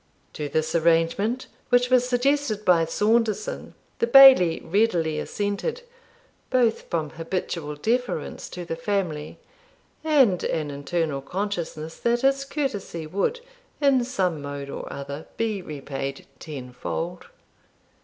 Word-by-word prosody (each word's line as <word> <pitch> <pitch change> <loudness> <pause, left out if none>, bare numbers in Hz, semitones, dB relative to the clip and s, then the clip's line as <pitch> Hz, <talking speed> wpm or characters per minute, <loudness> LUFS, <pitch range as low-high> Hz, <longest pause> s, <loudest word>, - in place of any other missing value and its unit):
To 150 -1 -4
this 155 +2 -1
arrangement, 170 +9 +2 0.2
which 245 0 +3
was 250 -1 +4
suggested 250 -4 +1
by 170 -2 +5
Saunderson, 225 - 0 0.2
the 235 - +2
Bailie 260 -10 +8
readily 170 -5 +1
assented, 210 - -3 0.7
both 245 -3 +1
from 155 -3 -2
habitual 165 -2 -4
deference 235 +1 -2
to 175 -1 -7
the 165 - -3
family, 165 -4 -2 0.7
and 270 - +4
an 155 -3 -1
internal 145 0 -2
consciousness 170 -3 -4
that 240 0 +1
his 275 0 +2
courtesy 260 - -3
would, 200 - -1 0.4
in 275 -4 +4
some 185 - -1
mode 140 -1 -6
or - - -6
other, 140 +2 -7
be 220 -4 -1
repaid 135 -3 -6
tenfold. 150 +5 -5
185 Hz, 115 wpm, -25 LUFS, 155-245 Hz, 0.7 s, Bailie